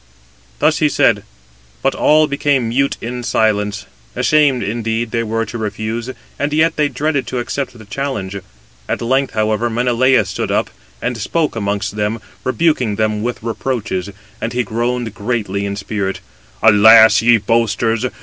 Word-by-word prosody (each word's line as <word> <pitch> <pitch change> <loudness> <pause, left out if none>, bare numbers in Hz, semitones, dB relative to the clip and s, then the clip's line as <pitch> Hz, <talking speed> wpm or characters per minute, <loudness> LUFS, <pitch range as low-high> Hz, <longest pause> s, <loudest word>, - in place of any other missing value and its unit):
Thus - - +2
he - - +3
said, - - +3 0.6
but - - +2
all 155 +1 +4
became 140 -4 0
mute 140 +4 0
in 120 +1 -4
silence. 105 -3 0 0.3
Ashamed 145 -5 +3
indeed 115 +2 -2
they 115 - 0
were 115 0 -1
to 120 - -7
refuse, 110 +3 -4 0.3
and 145 +1 -1
yet 155 +2 +2
they 150 -1 +1
dreaded 145 -5 -1
to 125 - -3
accept 125 +1 -3
[the 110 - -13
challenge]. 105 -5 -4 0.5
At - - -1
length, 130 +2 0
however, 110 +2 0
Menelaus 120 -1 +2
stood 90 - -3
up, - - 0 0.3
and 125 -2 -2
spoke 155 +7 -1
amongst 100 -1 -2
them, 105 +2 -1 0.2
rebuking 130 -6 +1
them 110 0 0
with 120 0 -4
reproaches, 110 -5 -3 0.3
and 115 +2 -3
he 125 0 0
groaned 120 +1 -2
greatly 105 -3 -2
in 100 - -3
spirit: 100 -1 -3 0.4
"Alas! 110 -1 +7
ye 120 0 +5
boasters! 115 +2 0
115 Hz, 150 wpm, -17 LUFS, 105-125 Hz, 0.6 s, Alas